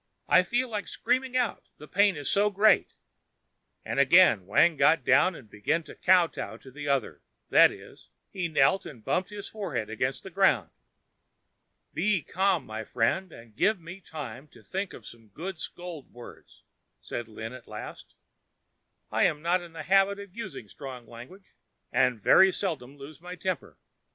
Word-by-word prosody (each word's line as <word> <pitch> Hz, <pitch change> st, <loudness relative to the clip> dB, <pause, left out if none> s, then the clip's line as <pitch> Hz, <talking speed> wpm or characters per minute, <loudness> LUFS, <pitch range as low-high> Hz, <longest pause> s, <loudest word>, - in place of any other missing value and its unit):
I 185 Hz, -, +6 dB
feel 240 Hz, +8 st, 0 dB
like 210 Hz, -4 st, -4 dB
screaming 255 Hz, 0 st, 0 dB
out, 245 Hz, -4 st, -2 dB
the 150 Hz, -, -12 dB
pain 200 Hz, +1 st, +3 dB
is 145 Hz, -2 st, -5 dB
so 205 Hz, +1 st, +3 dB
great," 205 Hz, 0 st, +3 dB, 0.9 s
and -, -, -2 dB
again 140 Hz, -, +5 dB
Wang 160 Hz, -, +4 dB
got 155 Hz, 0 st, +4 dB
down 145 Hz, +7 st, +4 dB
and 130 Hz, -, -12 dB
began 145 Hz, +12 st, -1 dB
to -, -, -12 dB
kowtow 180 Hz, -2 st, +2 dB
to 130 Hz, -, -15 dB
the 145 Hz, +2 st, -7 dB
other; 130 Hz, -, -1 dB, 0.3 s
that -, -, +7 dB
is, -, -, -14 dB, 0.2 s
he 180 Hz, -3 st, -2 dB
knelt 160 Hz, +4 st, +3 dB
and 120 Hz, -7 st, -12 dB
bumped 185 Hz, +1 st, 0 dB
his 205 Hz, -1 st, -7 dB
forehead 140 Hz, -, -4 dB
against 130 Hz, +4 st, -2 dB
the 190 Hz, -, -9 dB
ground. 135 Hz, -, +2 dB, 1.2 s
"Be 185 Hz, +2 st, +1 dB
calm, 190 Hz, +1 st, 0 dB
my 110 Hz, +1 st, -6 dB
friend, 125 Hz, -, 0 dB
and 115 Hz, -5 st, -14 dB
give 210 Hz, -, +2 dB
me 170 Hz, +3 st, -10 dB
time 150 Hz, -4 st, -8 dB
to -, -, -19 dB
think 195 Hz, +1 st, -4 dB
of 115 Hz, -, -12 dB
some 115 Hz, -2 st, -12 dB
good 165 Hz, -, -7 dB
scold 175 Hz, -4 st, -8 dB
words," 120 Hz, 0 st, -14 dB, 0.4 s
said 120 Hz, -1 st, -6 dB
Lin 110 Hz, +1 st, -7 dB
at 130 Hz, -2 st, -12 dB
last. 105 Hz, 0 st, -9 dB, 1.0 s
"I -, -, +3 dB
am 150 Hz, 0 st, 0 dB
not 175 Hz, +2 st, +2 dB
in 170 Hz, -1 st, -12 dB
the 165 Hz, -, -7 dB
habit 195 Hz, +1 st, +3 dB
of 200 Hz, -2 st, -11 dB
using 145 Hz, -, -7 dB
strong 130 Hz, +1 st, -9 dB
language, 125 Hz, -, -13 dB, 0.4 s
and 125 Hz, -3 st, +2 dB
very 190 Hz, -, +6 dB
seldom 145 Hz, -9 st, -4 dB
lose 145 Hz, +3 st, -11 dB
my 180 Hz, +1 st, -8 dB
temper. 185 Hz, 0 st, -4 dB
165 Hz, 170 wpm, -28 LUFS, 125-190 Hz, 1.2 s, that